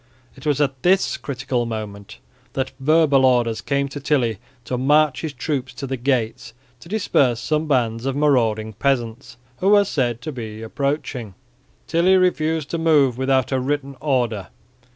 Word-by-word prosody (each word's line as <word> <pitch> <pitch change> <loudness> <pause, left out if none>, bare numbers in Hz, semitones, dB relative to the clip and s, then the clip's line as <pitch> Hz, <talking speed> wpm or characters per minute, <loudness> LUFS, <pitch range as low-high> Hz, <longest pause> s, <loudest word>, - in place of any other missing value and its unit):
It 135 +2 -9
was 145 -2 +1
at 135 -3 0
this 190 +2 +3
critical 125 -3 -3
moment 105 -2 -6 0.4
that 130 -1 -2
verbal 145 -1 +4
orders 120 -3 +2
came 140 -1 0
to 145 - -6
Tilly 130 -7 0 0.3
to 125 - -2
march 140 +1 +3
his 160 - -3
troops 130 -2 -3
to 130 - -5
the 135 0 -3
gates 120 -3 -1 0.3
to 165 - -14
disperse 140 - +1
some 155 +3 -1
bands 120 -3 0
of 135 - -1
marauding 115 -7 +1
peasants 120 0 -2 0.2
who 190 - +1
were 205 -1 +6
said 125 - -1
to 155 - -5
be 110 -4 -7
approaching. 125 -4 -3 0.5
Tilly 180 +3 +3
refused 160 -4 +1
to 170 - -2
move 150 -6 +3
without 130 -1 +1
a 130 - +1
written 140 +1 -2
order. 120 -9 0
135 Hz, 160 wpm, -21 LUFS, 120-150 Hz, 0.5 s, were